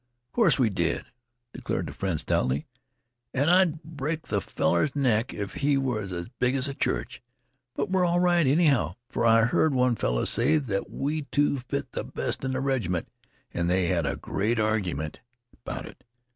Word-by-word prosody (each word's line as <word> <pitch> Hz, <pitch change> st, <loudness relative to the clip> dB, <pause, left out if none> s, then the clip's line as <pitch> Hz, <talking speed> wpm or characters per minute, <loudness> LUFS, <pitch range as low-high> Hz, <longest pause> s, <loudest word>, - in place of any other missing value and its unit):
"Of -, -, -50 dB
course 195 Hz, -, +4 dB
we 120 Hz, -5 st, +2 dB
did," 85 Hz, -3 st, -1 dB, 0.5 s
declared -, -, -3 dB
the -, -, -7 dB
friend 95 Hz, -5 st, -2 dB
stoutly. 65 Hz, +3 st, 0 dB, 0.7 s
"An' 140 Hz, +4 st, +2 dB
I'd 175 Hz, -3 st, +3 dB
break 155 Hz, 0 st, -4 dB
th' 100 Hz, -2 st, -1 dB
feller's 90 Hz, -, 0 dB
neck 125 Hz, -4 st, +2 dB
if 100 Hz, -2 st, -5 dB
he 145 Hz, -1 st, +1 dB
was 115 Hz, -8 st, -2 dB
as 85 Hz, -1 st, -4 dB
big 125 Hz, +1 st, +2 dB
as 135 Hz, 0 st, +1 dB
a 140 Hz, -, -3 dB
church. -, -, -2 dB, 0.5 s
But -, -, -2 dB
we're 190 Hz, -1 st, +3 dB
all 175 Hz, 0 st, +2 dB
right, 175 Hz, -4 st, +3 dB
anyhow, 140 Hz, -, +3 dB
for 115 Hz, -, +1 dB
I 115 Hz, 0 st, +6 dB
heard 140 Hz, +4 st, +2 dB
one 125 Hz, -1 st, +3 dB
feller -, -, 0 dB
say 155 Hz, -, +3 dB
that 110 Hz, -10 st, -2 dB
we 150 Hz, +1 st, -2 dB
two 145 Hz, -1 st, +2 dB
fit 120 Hz, -, -4 dB
th' -, -, -6 dB
best -, -, -1 dB
in 130 Hz, -, -1 dB
th' 130 Hz, +1 st, -1 dB
reg'ment, 110 Hz, -11 st, -1 dB, 0.4 s
an' 85 Hz, 0 st, -1 dB
they 90 Hz, -1 st, +2 dB
had 85 Hz, -5 st, +1 dB
a -, -, -1 dB
great 110 Hz, +4 st, -1 dB
argument 95 Hz, -9 st, -1 dB, 0.5 s
'bout -, -, -5 dB
it. -, -, -13 dB
125 Hz, 185 wpm, -27 LUFS, 95-145 Hz, 0.7 s, I